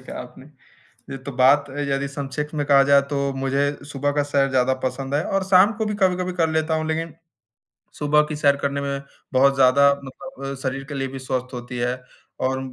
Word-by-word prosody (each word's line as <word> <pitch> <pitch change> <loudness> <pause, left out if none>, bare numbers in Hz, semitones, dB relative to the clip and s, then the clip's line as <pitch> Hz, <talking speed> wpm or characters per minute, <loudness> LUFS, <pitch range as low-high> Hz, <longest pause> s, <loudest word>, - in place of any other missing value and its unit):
कहा - - -8
आपने। - - -12 0.6
ये 135 - -4
तो 140 +1 -6
बात 140 +3 +5 0.2
यदि 140 0 -1
संक्षेप 140 +1 -4
में 145 -1 -1
कहा 140 -1 +6
जाए 140 0 +7
तो 140 -1 -1
मुझे 135 +1 0 0.3
सुबह 145 +1 -1
का 145 0 +1
सैर 140 -1 +1
ज़्यादा 130 0 +2
पसंद 135 +2 -3
है 150 - +2
और 195 -1 -1
शाम 190 +2 +5
को 220 - -1
भी 210 - -2
कभी-कभी 185 -1 +1
कर 165 -2 +1
लेता 160 0 0
हूँ, 155 0 -1
लेकिन 160 0 -3 0.8
सुबह 150 0 +3
की 155 - -4
सैर 140 -1 +3
करने 140 0 -2
में 140 -1 -3 0.3
बहुत 135 +1 +4
ज़्यादा 135 +1 +5
मतलब 135 0 -8
शरीर 135 0 -3
के 145 +1 -8
लिए 135 -1 -2
भी 135 - -7
स्वस्थ 130 -1 -4
होती 125 0 -6
है। 125 +1 -2 0.4
और 130 0 0
140 Hz, 205 wpm, -22 LUFS, 135-150 Hz, 0.8 s, जाए